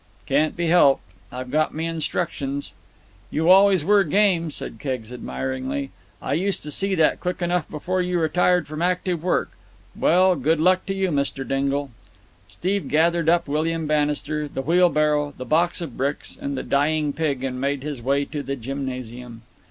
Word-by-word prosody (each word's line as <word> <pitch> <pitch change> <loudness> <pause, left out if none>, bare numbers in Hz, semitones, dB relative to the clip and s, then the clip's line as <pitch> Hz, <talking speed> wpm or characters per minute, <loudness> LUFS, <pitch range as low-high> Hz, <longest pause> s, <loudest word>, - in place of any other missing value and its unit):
"Can't 150 +4 +1
be 170 - 0
helped. 155 -6 +5 0.3
I've 125 0 -6
got 155 +1 +1
me 160 +1 -2
instructions." 155 -3 -3 0.6
"You 160 +3 +2
always 190 -4 +6
were 205 0 +5
game," 180 -1 +2
said 115 -6 -7
Keggs 125 -4 -4
admiringly. 130 +2 -4 0.3
"I 135 - -1
used 190 +6 -1
to 150 - -5
see 195 +5 +1
that 160 -3 +3
quick 180 0 -3
enough 175 -2 -1
before 180 +5 -2
you 180 0 -1
retired 180 +2 +2
from 155 +1 -6
active 180 -1 0
work. 180 - 0 0.4
Well, 185 +2 +4
good 155 +3 +1
luck 185 +3 +3
to 195 - -2
you, 190 -1 0
Mr. 140 -3 -2
Dingle." 140 +1 -1 0.6
Steve 195 - -2
gathered 165 +1 +2
up 170 -1 +2
William 160 +2 -1
Bannister, 150 0 0
the 135 -2 -5
wheelbarrow, 150 -3 +2
the 130 - -6
box 170 +6 +1
of 155 -8 -6
bricks, 140 +3 -2
and 140 -1 -4
the - - -3
dying 150 +1 +1
pig 140 -5 -1
and 130 -1 -3
made 140 0 -1
his 145 -4 -5
way 140 +3 +1
to 150 0 -5
the 140 0 -4
gymnasium. 125 -2 -6
150 Hz, 170 wpm, -23 LUFS, 140-175 Hz, 0.6 s, always